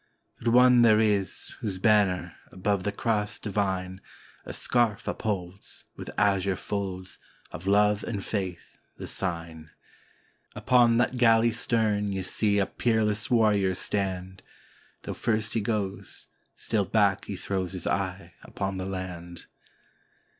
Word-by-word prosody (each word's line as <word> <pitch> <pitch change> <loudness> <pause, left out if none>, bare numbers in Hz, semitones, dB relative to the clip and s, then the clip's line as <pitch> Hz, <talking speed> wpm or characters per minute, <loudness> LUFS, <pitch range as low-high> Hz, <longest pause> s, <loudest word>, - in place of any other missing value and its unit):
But 120 - -6
one 125 +1 +6
there 110 -2 +6
is, 100 -4 0
whose 100 -4 -3
banner, 100 -3 +2 0.2
above 100 +1 -1
the 105 - 0
Cross 105 0 -1
divine, 95 -3 -2 0.4
A - - -6
scarf 120 -4 +1
upholds, 95 -3 -4
with - - -8
azure 100 -2 +2
folds, 95 -2 -5 0.3
of 90 - -8
love 105 +1 +3
and 100 -4 -4
faith 95 -5 -4 0.2
the - - -7
sign: 85 -2 -5 0.9
Upon 120 -2 +4
that 120 +1 +1
galley's 115 -1 +4
stem 105 -4 +1
ye 95 -1 -3
'see 100 +2 +1
a 100 - +3
peerless 110 -2 0
warrior 105 -6 +3
stand, 95 -1 -2 0.6
Though - - -4
first 110 -2 0
he 115 - +1
goes, 100 -3 -3 0.3
still 105 -3 -1
back 100 0 +2
he 100 - -5
throws 95 -1 -3
his 90 - -6
eye 95 -3 -2
upon 95 -1 -4
the 95 0 -4
land. 90 -3 -6
100 Hz, 130 wpm, -27 LUFS, 95-110 Hz, 0.9 s, one